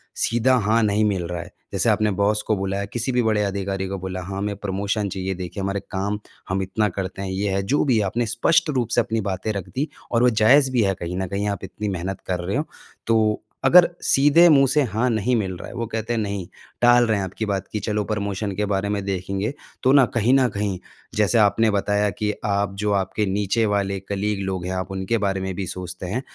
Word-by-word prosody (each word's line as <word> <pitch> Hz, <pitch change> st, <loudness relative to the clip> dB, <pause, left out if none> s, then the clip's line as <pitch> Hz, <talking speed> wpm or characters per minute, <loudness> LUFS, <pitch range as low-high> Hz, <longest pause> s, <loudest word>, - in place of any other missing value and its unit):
सीधा 120 Hz, +3 st, +2 dB
हाँ, 110 Hz, +1 st, +2 dB
नहीं 105 Hz, 0 st, +2 dB
मिल 95 Hz, -4 st, 0 dB
रहा 85 Hz, 0 st, -4 dB
है, -, -, -11 dB, 0.2 s
जैसे -, -, +2 dB
आपने 105 Hz, -1 st, +2 dB
बॉस 105 Hz, +1 st, +2 dB
को 110 Hz, -, +2 dB
बुलाया, 95 Hz, +1 st, -2 dB
किसी 120 Hz, +5 st, -3 dB
भी 125 Hz, 0 st, +2 dB
बड़े 110 Hz, -2 st, +2 dB
अधिकारी 95 Hz, -1 st, -2 dB
को 95 Hz, -, -3 dB
बोला, 95 Hz, 0 st, -5 dB
हाँ, 95 Hz, +2 st, -6 dB
हमें 100 Hz, +1 st, -2 dB
प्रमोशन 100 Hz, +1 st, -2 dB
चाहिए 95 Hz, 0 st, -3 dB
देखिए 90 Hz, +2 st, -5 dB
हमारे 100 Hz, +1 st, -1 dB
काम 100 Hz, +2 st, -2 dB, 0.3 s
हम 95 Hz, +1 st, 0 dB
इतना 105 Hz, +3 st, 0 dB
करते 95 Hz, 0 st, -4 dB
हैं, 95 Hz, -, -3 dB
ये 100 Hz, +2 st, -1 dB
है, 95 Hz, -, +1 dB
जो 140 Hz, +9 st, +1 dB
भी 130 Hz, -5 st, +3 dB
है, 105 Hz, -, +2 dB
आपने 120 Hz, +5 st, -1 dB
स्पष्ट 165 Hz, +7 st, +3 dB
रूप 115 Hz, -, -4 dB
से -, -, +5 dB
अपनी 110 Hz, 0 st, -2 dB
बातें 95 Hz, +4 st, -2 dB
रख 100 Hz, -4 st, -5 dB
दी 145 Hz, +4 st, -1 dB, 0.2 s
और 115 Hz, 0 st, +3 dB
वो 125 Hz, -, +6 dB
जायज़ 135 Hz, +3 st, +6 dB
भी 120 Hz, -3 st, +2 dB
है 95 Hz, -1 st, +1 dB
कहीं 85 Hz, +1 st, -4 dB
न 95 Hz, 0 st, -2 dB
कहीं 100 Hz, +3 st, -2 dB
आप 100 Hz, -2 st, -4 dB
इतनी 105 Hz, +2 st, -4 dB
मेहनत 95 Hz, +1 st, -4 dB
कर 90 Hz, -1 st, -1 dB
रहे 100 Hz, +8 st, -1 dB
हो। 150 Hz, -, -2 dB, 0.4 s
तो 110 Hz, -2 st, +2 dB, 0.2 s
अगर 175 Hz, +5 st, +8 dB, 0.2 s
सीधे 145 Hz, +5 st, +5 dB
मुँह 135 Hz, -3 st, +6 dB
से 150 Hz, +3 st, +3 dB
हाँ, 120 Hz, +1 st, 0 dB
नहीं 115 Hz, +2 st, +1 dB
मिल 95 Hz, -5 st, -1 dB
रहा -, -, -8 dB
है, -, -, -10 dB
वो 115 Hz, -, -2 dB
कहते 115 Hz, +1 st, -3 dB
हैं 115 Hz, -, 0 dB
नहीं, 100 Hz, -4 st, -3 dB, 0.3 s
टाल 120 Hz, 0 st, +6 dB
रहे 110 Hz, -2 st, +2 dB
हैं 100 Hz, -, -1 dB
आपकी 95 Hz, +4 st, -4 dB
बात 100 Hz, -2 st, -2 dB
की 105 Hz, -, -2 dB
चलो 105 Hz, 0 st, -1 dB
प्रमोशन 100 Hz, -1 st, -2 dB
के 105 Hz, +2 st, 0 dB
बारे 100 Hz, 0 st, -1 dB
में 100 Hz, -1 st, -1 dB
देखेंगे। 100 Hz, +4 st, -2 dB, 0.3 s
तो 130 Hz, -, +4 dB
ना 135 Hz, -2 st, +7 dB
कहीं 120 Hz, +2 st, +3 dB
न 135 Hz, -1 st, +5 dB
कहीं 100 Hz, -2 st, -2 dB, 0.4 s
जैसे 105 Hz, +2 st, +2 dB
आपने 105 Hz, +2 st, +4 dB
बताया 105 Hz, +1 st, +1 dB
कि 105 Hz, +2 st, -2 dB
आप 100 Hz, -1 st, 0 dB
जो 105 Hz, 0 st, 0 dB
आपके 100 Hz, +2 st, 0 dB
नीचे 100 Hz, +3 st, 0 dB
वाले 100 Hz, -2 st, 0 dB
कलीग 100 Hz, +1 st, -2 dB
लोग 95 Hz, -2 st, -3 dB
हैं, 90 Hz, -, -3 dB
आप 95 Hz, +1 st, -4 dB
उनके 95 Hz, +4 st, -1 dB
बारे 100 Hz, -2 st, -1 dB
में 95 Hz, 0 st, -3 dB
भी 95 Hz, -, -3 dB
सोचते 90 Hz, 0 st, -6 dB
हैं, 105 Hz, +8 st, -2 dB
100 Hz, 240 wpm, -23 LUFS, 95-110 Hz, 0.4 s, अगर